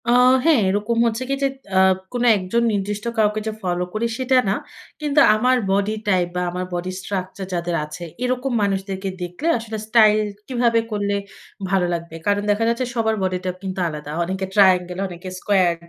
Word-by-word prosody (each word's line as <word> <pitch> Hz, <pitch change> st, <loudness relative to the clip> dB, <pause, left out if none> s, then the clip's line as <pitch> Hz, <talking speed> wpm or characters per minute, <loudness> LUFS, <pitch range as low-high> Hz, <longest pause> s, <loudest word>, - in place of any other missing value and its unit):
আ -, -, +5 dB, 0.3 s
হ্যাঁ, 320 Hz, -6 st, +5 dB
এরকম 210 Hz, +4 st, 0 dB
হচ্ছে 230 Hz, +2 st, -1 dB
কি -, -, +1 dB
যে -, -, +4 dB, 0.3 s
এ্যাঁ 190 Hz, 0 st, +5 dB, 0.2 s
কোন 245 Hz, -1 st, -1 dB
একজন 195 Hz, +5 st, 0 dB
নির্দিষ্ট 205 Hz, +2 st, -3 dB
কাউকে 215 Hz, 0 st, +1 dB
ফলো 180 Hz, -1 st, -1 dB
করি 220 Hz, +2 st, 0 dB
সেটা 260 Hz, 0 st, +2 dB
না। 195 Hz, -, +2 dB, 0.5 s
কিন্তু 295 Hz, -1 st, +2 dB, 0.2 s
আমার 250 Hz, +4 st, +3 dB
বডি 200 Hz, +2 st, +1 dB
টাইপ 185 Hz, -3 st, +2 dB
বা 180 Hz, -, 0 dB
আমার 180 Hz, +1 st, -3 dB
বডি 175 Hz, +1 st, -3 dB
স্ট্রাকচার 190 Hz, 0 st, -4 dB
যাদের 170 Hz, 0 st, -1 dB
আছে 150 Hz, +3 st, -9 dB, 0.2 s
এরকম 255 Hz, +1 st, -1 dB
মানুষদেরকে 195 Hz, -1 st, -2 dB
দেখলে 180 Hz, -, -4 dB
আসলে 225 Hz, -1 st, -6 dB
স্টাইল 215 Hz, -2 st, +5 dB, 0.3 s
কিভাবে 235 Hz, -3 st, +2 dB
করলে 205 Hz, -1 st, -1 dB, 0.6 s
ভালো 190 Hz, -2 st, +3 dB
লাগবে। 170 Hz, -1 st, -5 dB
কারণ 205 Hz, 0 st, +2 dB
দেখা 205 Hz, +2 st, +1 dB
যাচ্ছে 235 Hz, +2 st, 0 dB
সবার 220 Hz, -1 st, +1 dB
বডি 185 Hz, -1 st, 0 dB
টা 185 Hz, -, 0 dB
কিন্তু 190 Hz, 0 st, -4 dB
আলাদা। 150 Hz, -2 st, -6 dB
অনেকে 190 Hz, +2 st, -3 dB
ট্রায়াঙ্গল, 180 Hz, -3 st, +4 dB
অনেকে 180 Hz, +1 st, -8 dB
স্কোয়ার। 185 Hz, -4 st, +2 dB
200 Hz, 175 wpm, -21 LUFS, 185-225 Hz, 0.6 s, আ